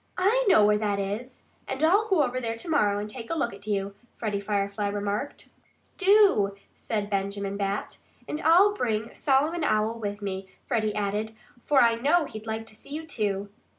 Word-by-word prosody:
"I 435 +7 +3
know 215 - +6
where 210 0 +3
that 205 -2 0
is; 210 +6 -5 0.2
and 265 +3 -3
I'll 395 +7 +4
go 375 -8 +3
over 255 -1 -2
there 230 -1 -2
to 230 - -7
morrow 210 -11 +2
and 205 +1 -3
take 230 +1 -8
a 330 - -1
look 240 -9 -1
at 200 +1 -12
you," 200 -1 -1 0.2
Freddie 210 -3 -2
Firefly 200 0 -1
remarked. 205 +6 -3 0.5
"Do!" 390 - +4 0.2
said 210 -2 -3
Benjamin 200 0 -2
Bat. 200 0 -3 0.3
"And 300 - -4
I'll 365 +6 +5
bring 225 - -2
Solomon 300 +5 +1
Owl 220 -3 +1
with 205 -1 -4
me," 190 -1 -4 0.2
Freddie 220 -4 0
added. 210 +2 -2 0.3
"For 285 -2 +4
I 230 -1 +4
know 300 +7 +3
he'd 215 -4 -9
like 220 0 -3
to 220 -1 -10
see 220 - -13
you, 310 +3 -5
too." 205 -7 -2
220 Hz, 185 wpm, -27 LUFS, 205-285 Hz, 0.5 s, know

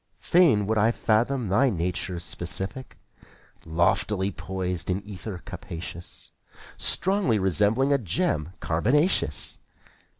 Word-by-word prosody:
Fain 160 - +4
would 110 +1 +1
I 110 +2 +4
fathom 120 +3 +1
thy 130 +8 +3
nature's 90 -2 -2
specific 95 +9 -3 0.7
Loftily 95 +4 +1
poised 90 -2 -4
in 95 +2 -1
ether 95 -2 -7
capacious. 85 +1 -8 0.4
Strongly 190 - +1
resembling 105 - +2
a 140 - +2
gem 90 - -1
carbonaceous. 130 - +2
100 Hz, 100 wpm, -26 LUFS, 90-125 Hz, 0.7 s, Fain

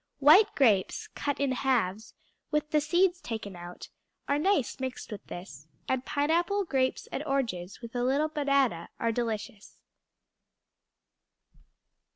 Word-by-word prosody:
White 305 +10 +6
grapes, 215 -9 +2
cut 285 -1 -2
in 280 -1 +1
halves, 230 -6 0 0.3
with 300 0 -1
the 300 - +3
seeds 355 +4 +2
taken 220 - -5
out, 175 0 -9 0.4
are 285 +1 +1
nice 340 - +1
mixed 260 -2 -5
with 210 - -7
this, 160 -5 -9 0.2
and 260 -1 0
pineapple, 340 +8 +1
grapes, 265 -5 0
and 280 - -3
oranges, 225 - -2
with 235 0 -9
a 245 - 0
little 275 +5 +2
banana, 275 - +1
are 230 - +1
delicious. 220 -3 -4
260 Hz, 130 wpm, -29 LUFS, 220-300 Hz, 0.4 s, White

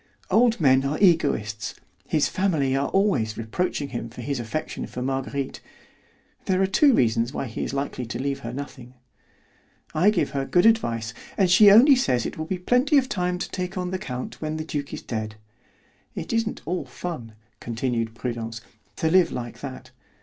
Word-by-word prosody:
Old 235 0 +4
men 135 -4 +4
are 140 +3 -1
egoists; 110 - +2 0.3
his 155 -2 +2
family 155 -9 +1
are 140 +1 +1
always 145 - +1
reproaching 140 +5 -2
him 120 -2 -5
for 120 +2 -9
his 135 +2 -2
affection 120 +7 -4
for 125 - -5
Marguerite; 135 +1 -3 0.8
there 185 -1 +1
are 195 - +4
two 265 +7 +4
reasons 115 +1 +2
why - - -3
he 115 - -4
is - - -3
likely 135 -3 -3
to 115 - -4
leave 140 +1 -2
her 115 - -6
nothing. 125 -2 -8 1.0
I 175 +7 +4
give 170 -9 0
her 140 -1 -1
good 175 +7 +2
advice, 120 - +2 0.2
and 190 -3 +3
she 205 +3 +8
only 245 +8 +8
says 125 - +1
it - - -4
will 155 - -4
be 185 +3 -2
plenty 250 - +3
of 260 -2 +2
time 180 -1 -1
to - - -5
take 185 0 -4
on 180 0 -2
the 185 - -2
count 125 -5 -6
when 155 0 -2
the 155 - -4
duke 145 -3 -4
is - - -6
dead. 110 -2 -4 0.8
It - - -4
isn't 230 -1 -1
all 180 +4 -2
fun," 125 -11 -6 0.3
continued 115 -1 -2
Prudence, 115 -1 -4 0.4
"to 160 - 0
live 180 -2 +5
like 120 -1 -6
that. 130 -2 -8
140 Hz, 185 wpm, -24 LUFS, 120-185 Hz, 1.0 s, she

